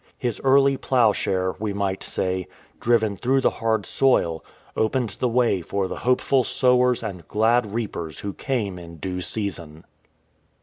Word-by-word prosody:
His 120 -4 -3
early 135 0 +4
ploughshare, 100 -8 +1
we 105 -1 -2
might 100 -1 -2
say, 95 -1 -2 0.3
driven 110 -4 +2
through 130 +6 +1
the - - +3
hard 110 -3 -1
soil, 85 -12 +1 0.3
opened 115 +1 0
the 125 - +1
way 115 -6 +2
for 95 +3 -2
the - - -6
hopeful 125 +1 +2
sowers 125 0 +2
and 90 -7 -6
glad 110 0 +2
reapers 85 -9 -4
who 100 -1 -4
came 105 -9 -3
in 85 -1 -10
due 90 +3 -4
season. 85 -7 -5
110 Hz, 145 wpm, -23 LUFS, 95-125 Hz, 0.3 s, early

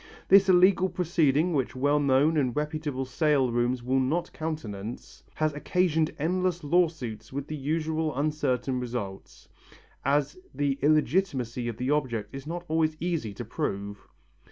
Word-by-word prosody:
This 195 0 +7
illegal 185 +1 +5
proceeding, 165 -2 +1
which 135 -4 -1
well 145 +3 +2
known 140 +3 +3
and 130 -6 +1
reputable 150 -3 -2
sale 140 -2 +2
rooms 120 +1 0
will 130 +2 +1
not 150 +7 -1
countenance, 120 -9 -6
has 155 -1 0
occasioned 160 +1 +1
endless 180 +2 0
lawsuits 145 -9 0
with 135 +1 -4
the 155 - -5
usual 155 +1 -1
uncertain 135 -4 0
results, 115 -6 -6 0.6
as 145 - +1 0.2
the 140 -1 0
illegitimacy 145 -5 +1
of 115 -2 -4
the 125 +3 -1
object 120 -8 -1
is 135 +1 -8
not 175 +2 -5
always 155 0 +1
easy 165 -11 -2
to - - -6
prove. 100 +1 -4
145 Hz, 140 wpm, -27 LUFS, 130-160 Hz, 0.6 s, This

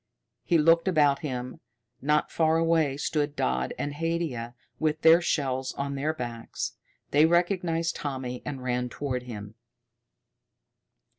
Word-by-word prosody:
He 170 - +3
looked 165 +2 +4
about 145 -6 +4
him. 130 -1 -5 0.4
Not 150 +2 +1
far 160 0 +2
away 165 -4 +2
stood 145 0 -1
Dodd 65 - 0
and 145 - -3
Haidia, 150 -7 -2 0.2
with 155 0 0
their 165 +2 +7
shells 130 -6 -1
on 140 0 -3
their 140 +3 0
backs. 120 -6 -5 0.4
They 150 +3 +6
recognized 170 -1 +1
Tommy 130 -3 -4
and 135 -3 -5
ran 125 0 -1
toward 130 -1 -3
him. 105 -4 -8
145 Hz, 130 wpm, -27 LUFS, 125-165 Hz, 0.4 s, their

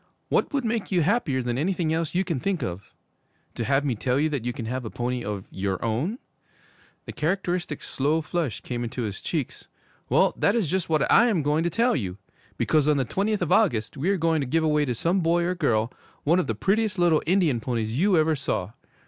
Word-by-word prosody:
'What - - +1
would 275 -3 -1
make 225 -2 -2
you 175 -4 +3
happier 150 - +1
than 120 +1 -1
anything 170 -1 0
else 165 0 -2
you 185 - +3
can 170 -7 -2
think 190 +3 -1
of? 90 +2 -6 0.6
To - - -3
have 140 +4 +1
me 135 - +1
tell 125 +4 0
you 155 +2 +2
that 140 -6 -3
you 125 - -1
can 120 -2 -6
have 125 +3 -3
a 110 - -5
pony 125 +1 -3
of 100 -2 -4
your 95 0 -2
own?' 135 - -1 0.9
The - - -6
characteristic, 175 -2 -2
slow 150 +4 0
flush 155 -8 -2
came 120 -1 -4
into 120 +1 -4
his 100 -3 -5
cheeks. - - -4 0.4
'Well, - - +4
that 200 - +2
is 205 -10 0
just 185 -2 -1
what 155 -2 +2
I 240 - +6
am 190 -10 +1
going 150 +3 +1
to - - +2
tell 235 +3 +2
you! 95 -8 -3 0.4
Because 150 -2 +2
on 150 -1 +3
the 135 - +1
twentieth 205 - 0
of 175 - -3
August 150 - +2
we 150 +7 -1
are 200 - +2
going 165 -2 +1
to 135 - -2
give 160 +5 +1
away 150 -1 +2
to 125 -3 -2
some 170 - +1
boy 170 0 +2
or 180 +1 0
girl, 120 -9 0 0.3
one 170 +5 +3
of 185 - -1
the - - -1
prettiest 210 0 +1
little 170 -3 +3
Indian 170 -9 +3
ponies 115 0 -2
you 195 -2 +4
ever 155 0 +3
saw. 120 -8 -2
155 Hz, 225 wpm, -25 LUFS, 125-180 Hz, 0.9 s, I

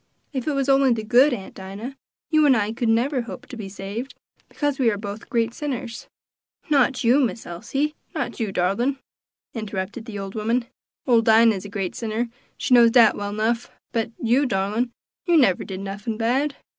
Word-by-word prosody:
If 260 -1 -3
it 300 - +1
was 275 -1 0
only 270 -1 +4
the 220 -2 -3
good, 250 +6 +5
Aunt 200 -6 -5
Dinah, 200 +8 -7 0.4
you 310 -1 +5
and 260 -4 +5
I 210 0 0
could 235 0 -1
never 250 +4 +2
hope 235 - -8
to - - -9
be 210 -4 -6
saved, 205 +7 -6 0.3
because 290 -2 -2
we 245 -3 +4
are 205 - -1
both 205 +1 -7
great 230 -2 0
sinners." 250 -5 -5 0.6
"Not 265 -3 +3
you, 245 +4 +5
Miss 240 -4 -1
Elsie! 275 - -2 0.2
not - - -3
you, 220 -4 -1
darlin'," 200 +10 0 0.6
interrupted 215 0 -4
the 220 -4 -6
old 195 0 -6
woman; 230 +3 0 0.4
"ole 235 -3 +5
Dinah's 220 -3 +4
a - - -7
great 195 -3 -3
sinner, 230 +1 -2 0.3
she 275 - 0
knows 235 -1 +8
dat 230 -2 +6
well 205 0 -4
nuff 225 +3 -1 0.2
but 225 -2 -1
you, 250 +5 +2
darlin', 215 +3 0 0.4
you 345 -1 +5
never 195 - +4
did 190 -1 -6
nuffin 205 +3 -4
bad." 265 +6 +1
230 Hz, 185 wpm, -23 LUFS, 205-255 Hz, 0.6 s, knows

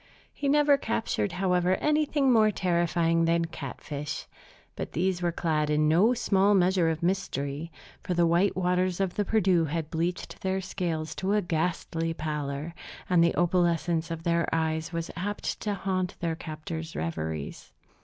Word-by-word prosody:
He 280 - -2
never 290 0 +5
captured, 225 -5 -1
however, 180 -1 +2
anything 300 -1 +2
more 215 -2 +5
terrifying 170 -3 +1
than 165 0 +2
catfish; 145 -1 -6 0.5
but - - -5
these 180 +1 0
were 175 -1 +1
clad 155 -3 0
in 150 0 +3
no 190 +11 +4
small 205 -3 +3
measure 180 -2 +3
of 160 0 -3
mystery, 165 -4 -2 0.3
for 180 - -2
the 170 0 +4
white 175 +4 +3
waters 180 0 +1
of 190 -2 0
the 205 - 0
Perdu 190 -5 +2
had 160 0 -3
bleached 170 +2 -3
their 190 0 0
scales 165 -4 -3
to 190 +6 -1
a 210 - +3
ghastly 165 -1 -1
pallor, 150 0 -3 0.4
and 175 -2 +5
the 170 - +2
opalescence 170 -1 +1
of 165 -1 -5
their 170 -1 +1
eyes 160 0 -1
was 165 -1 -3
apt 205 +5 -3
to 210 -2 -1
haunt 185 -1 -2
their 165 -1 -1
captor's 160 0 -6
reveries. 80 -2 -4
170 Hz, 155 wpm, -28 LUFS, 160-190 Hz, 0.5 s, never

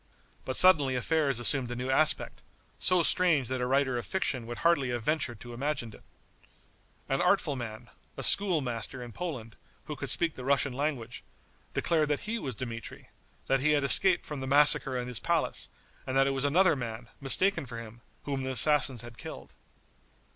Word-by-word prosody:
But 130 - -3
suddenly 150 -8 +5
affairs 140 0 0
assumed 125 +1 +4
a 120 - -5
new 125 +2 -3
aspect, 155 +3 +1 0.4
so 180 -2 +2
strange 165 -8 +2
that 130 -1 -3
a 125 - -1
writer 130 -2 0
of - - -8
fiction 130 -11 -2
would 120 0 -7
hardly 145 -7 +2
have 120 -2 -4
ventured 135 -5 -2
to 120 -1 -10
imagine 125 -3 -4
it. - - -15 1.1
An 135 - -1
artful 180 -6 +1
man, 115 -4 -8 0.3
a - - -6
schoolmaster 135 - +1
in 120 - -10
Poland, 115 - -7 0.3
who - - -6
could - - -6
speak 165 -2 +3
the 130 - -10
Russian 140 0 +1
language, 130 -4 -4 0.5
declared 155 -3 0
that 145 - -1
he 230 +2 -4
was 130 - -6
Dmitri; 115 -1 -8 0.4
that 135 - +1
he 150 +3 +2
had 145 -1 +1
escaped 175 +5 +6
from 150 -2 -6
the 130 - -6
massacre 145 -2 +4
in 125 0 -4
his 125 -3 -2
palace, - - -1 0.4
and 130 0 -1
that 135 - +4
it 135 - 0
was 135 +1 0
another 175 +4 +3
man, 120 -2 -7
mistaken 170 +3 +1
for 120 -1 -8
him, 115 0 -11 0.2
whom 140 -2 -4
the 130 - -4
assassins 135 -1 +2
had 120 -1 -12
killed. - - -10
135 Hz, 185 wpm, -28 LUFS, 120-150 Hz, 1.1 s, escaped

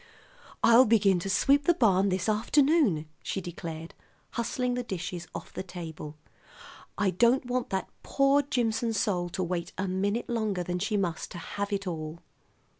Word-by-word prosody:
"I'll 235 +3 +7
begin 205 -5 +4
to 195 - -4
sweep 280 +9 +3
the 345 - +4
barn 200 - +3
this 185 -1 -1
afternoon," 235 - +3 0.2
she - - -3
declared, 165 -2 -7 0.4
hustling 245 +1 -1
the 250 - -1
dishes 180 -5 -5
off - - -7
the - - -4
table. 160 -5 -8 0.8
"I 205 -2 +2
don't 240 +7 +3
want 250 0 -2
that 190 0 -2
poor 275 +1 +3
Jimson 235 -4 0
soul 195 -4 0
to 185 +1 -2
wait 175 -1 -3
a 190 - -1
minute 200 +5 -1
longer 215 -6 -1
than 180 +1 -3
she 210 +3 0
must 175 -5 -2
to - - -7
have 200 +4 -4
it 200 0 -2
all." 160 -2 -4
200 Hz, 165 wpm, -28 LUFS, 180-235 Hz, 0.8 s, I'll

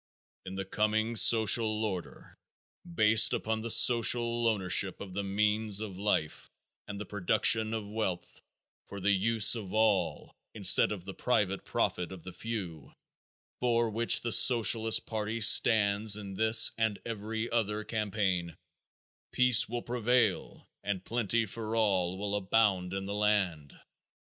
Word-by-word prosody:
In 95 - -8
the 95 0 -6
coming 110 +3 -2
social 110 -1 +4
order, 95 -5 -8 0.6
based 110 -8 +4
upon 110 0 -3
the 115 - -6
social 120 0 +4
ownership 95 -3 -1
of 95 -2 -10
the 100 - -4
means 105 +1 -1
of 100 -4 -8
life 100 -7 -3 0.4
and 100 -1 -8
the 105 - -7
production 110 +3 0
of 110 -2 -7
wealth 95 -5 -6 0.5
for 100 - -9
the 100 +2 0
use 110 +3 +3
of 105 -6 -5
all 105 -6 -1 0.2
instead - - +4
of 95 -4 -7
the 95 - -8
private 100 -6 -2
profit 90 0 -3
of 95 -3 -11
the 95 - -10
few, 90 -11 -7 0.7
for 120 -2 -1
which 115 +2 +1
the 120 - -4
Socialist 115 -2 +4
party 110 +1 -5
stands 105 -1 +4
in 100 -2 -9
this 110 +3 +5
and 110 -3 -1
every 110 0 -6
other 110 -2 -3
campaign, 100 -6 -3 0.7
peace 120 -2 +3
will 120 0 -5
prevail 120 -3 -2 0.2
and 95 -2 -5
plenty 115 -1 -2
for 110 +1 -7
all 95 -5 -1
will 100 +1 -4
abound 100 -2 -1
in 95 0 -5
the 100 - -6
land. 100 -8 -2
105 Hz, 140 wpm, -28 LUFS, 95-115 Hz, 0.7 s, this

